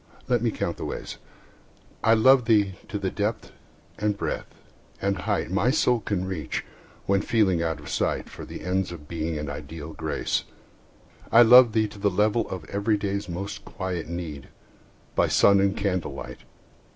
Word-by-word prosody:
Let 120 -2 +2
me 120 - +2
count - - -3
the - - -5
ways. - - -6 0.9
I 115 0 +5
love 130 +2 +5
thee 105 -4 +3
to 110 -2 -3
the 95 -2 -2
depth 105 +2 -2 0.5
and 105 -1 0
breadth - - -4 0.5
and 100 0 0
height 90 -2 -2
My 100 +6 +2
soul 125 -4 +3
can 100 -4 -2
reach, 95 -5 -4 0.4
when 100 0 +2
feeling 95 -7 +2
out 80 -2 -1
of 75 - -11
sight - - -1
For - - -10
the - - -8
ends 95 0 -1
of 75 -4 -10
Being 80 -1 -3
and 75 0 -4
ideal 75 +2 -7
Grace. - - -2 0.9
I 120 - +8
love 120 0 +8
thee 110 -1 +2
to 105 0 -12
the 100 0 +2
level 105 +4 +1
of 90 -4 -6
everyday's 100 0 -1
Most 100 +4 -5
quiet 90 -3 -4
need, 80 -5 -6 0.7
by - - +3
sun 100 -1 +5
and 100 0 +1
candlelight. 95 -3 -3
100 Hz, 165 wpm, -25 LUFS, 85-110 Hz, 0.9 s, I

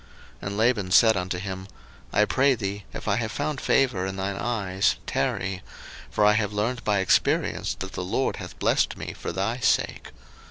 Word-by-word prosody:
01:030:027 - - -5
And 100 +1 -4
Laban 110 -5 +2
said 110 +3 +6
unto 90 -1 -2
him, 95 0 -5 0.4
I 105 - +4
pray 135 +4 +3
thee, 100 -2 -4
if - - -7
I 100 -1 +2
have 115 -2 -2
found 150 -4 -2
favour 120 -9 +2
in 95 - -4
thine 95 +1 -2
eyes, 100 -4 0
tarry: 95 0 -1 0.5
for 105 - +2
I 105 - +6
have 105 -1 0
learned 115 +4 -1
by 105 -2 +2
experience 95 -1 +1
that 95 0 -6
the - - -3
LORD 100 +9 -1
hath - - -8
blessed - - +1
me - - -6
for - - -5
thy 105 +6 -1
sake. 115 - +1
105 Hz, 190 wpm, -25 LUFS, 95-115 Hz, 0.5 s, said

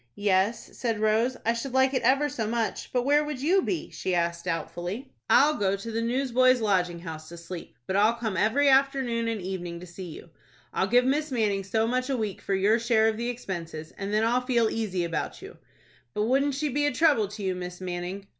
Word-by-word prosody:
"Yes," 205 +2 0
said 230 -4 -2
Rose, 220 +4 +2
"I 230 - +3
should 245 +3 -5
like 265 0 +3
it 260 - +1
ever 270 +5 +3
so 225 -6 -3
much; 230 0 -2
but 250 -1 +1
where 290 +2 +4
would 300 -3 -4
you 350 +8 +3
be?" 355 -2 -3
she 185 - -2
asked, 170 0 -1
doubtfully. 180 +9 -4 0.2
"I'll 295 +3 +6
go 200 -7 +1
to 200 +4 -6
the 225 +1 -1
Newsboys' 255 +1 +3
Lodging 180 -6 0
House 155 -2 -8
to 170 - -9
sleep, 170 +1 -9
but 190 - -2
I'll 215 +3 +4
come 225 -4 -3
every 225 +10 +3
afternoon 265 -4 +2
and 225 -2 -1
evening 175 -2 -5
to 180 - -9
see 180 +2 -9
you. 165 +1 -11 0.4
I'll 190 - +1
give 245 +3 +4
Miss 300 +4 +1
Manning 210 -6 0
so 220 +4 0
much 255 +3 -1
a 270 - 0
week 215 -4 -3
for 195 - -1
your 205 +4 +3
share 225 -1 +3
of 220 - -3
the 235 +1 -2
expenses, 170 -9 -6
and 200 0 -5
then 215 +1 +2
I'll 245 +2 +2
feel 240 -3 +1
easy 195 -6 -1
about 165 -1 -3
you. - - -11 0.6
But 210 - +1
wouldn't 270 +4 +2
she 295 +2 -1
be 290 +2 +1
a - - +1
trouble 290 -11 +3
to 205 +1 -8
you, 190 -1 0
Miss 180 0 -6
Manning?" 180 +2 -5
225 Hz, 220 wpm, -27 LUFS, 190-255 Hz, 0.6 s, I'll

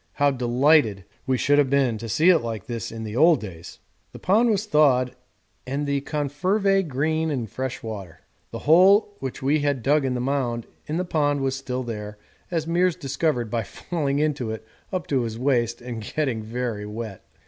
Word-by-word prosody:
How 145 0 +3
delighted 125 - +3 0.2
we 130 -1 +2
should 145 +3 +3
have 140 -3 +3
been 130 -5 +2
to 115 +1 -6
see 160 - +4
it 170 - +4
like 115 -6 -5
this 115 -4 -5
in 110 0 -6
the 110 0 -5
old 160 +4 +5
days! 85 -6 -9 0.4
The - - -8
pond 220 +6 +3
was 210 -1 +1
thawed 130 -8 +3 0.5
and 140 +3 -2
the 140 -1 0
#confervae 180 +7 0
green 155 +4 0
in 130 -6 -2
fresh 130 +4 -5
water. 100 -7 -7 0.3
The - - -6
hole 195 +6 +5
which 130 -1 -5
we 145 +3 +3
had 145 -4 -1
dug 145 +1 +3
in 130 -1 -1
the - - -2
mound 125 -3 -1 0.2
in 155 +2 -2
the 180 - -1
pond 145 -4 +1
was 135 -1 0
still 130 -1 -4
there, 105 -3 -6 0.3
as 165 -3 -1
Meares 175 +1 +2
discovered 135 -4 -1
by 115 - 0
falling 140 - -3
into 145 -5 0
it 110 0 -6 0.3
up 185 -5 -2
to 135 -3 +1
his 115 -2 -4
waist 120 -2 0
and 120 -2 -5
getting 125 +1 -2
very 110 -2 -4
wet. 105 -2 -7
135 Hz, 190 wpm, -24 LUFS, 115-155 Hz, 0.5 s, old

